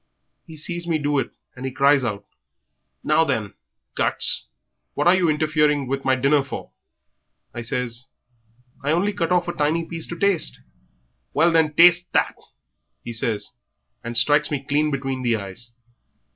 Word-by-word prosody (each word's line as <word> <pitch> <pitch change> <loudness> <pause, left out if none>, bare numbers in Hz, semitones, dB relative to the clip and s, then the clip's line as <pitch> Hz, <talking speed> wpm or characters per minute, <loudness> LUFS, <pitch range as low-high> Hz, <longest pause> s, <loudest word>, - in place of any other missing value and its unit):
He 160 -1 -11
sees 175 +3 -4
me 165 -2 +1
do 145 -1 0
it, - - -2 0.3
and 125 - -9
he 130 - -3
cries 140 +1 +3
out, 105 -4 -3 0.8
'Now 155 +2 +3
then, 110 -9 -2 0.4
guts, - - +3 0.5
what - - 0
are 175 - +6
you 185 -3 +2
interfering 150 -2 +1
with 135 +2 -3
my 130 0 +3
dinner 140 +2 +2
for?' 135 - -8 0.8
I 120 - -5
says, 125 +1 -3 0.8
'I 145 +2 +1
only 195 +5 +1
cut 175 -3 -2
off 180 -1 +2
a 175 - -2
tiny 160 +1 0
piece 165 -1 -5
to 170 - -6
taste.' 200 -3 0 0.8
'Well, 170 +1 +4
then, 160 -2 +2
taste 175 +1 +5
that,' - - +2 0.7
he 120 - -6
says, 115 -2 -2 0.5
and 115 0 -4
strikes 145 +6 +3
me 140 -2 -3
clean 150 +1 +2
between 135 -2 -3
the 120 -2 +1
eyes. 105 +3 -8
145 Hz, 160 wpm, -22 LUFS, 130-165 Hz, 0.8 s, are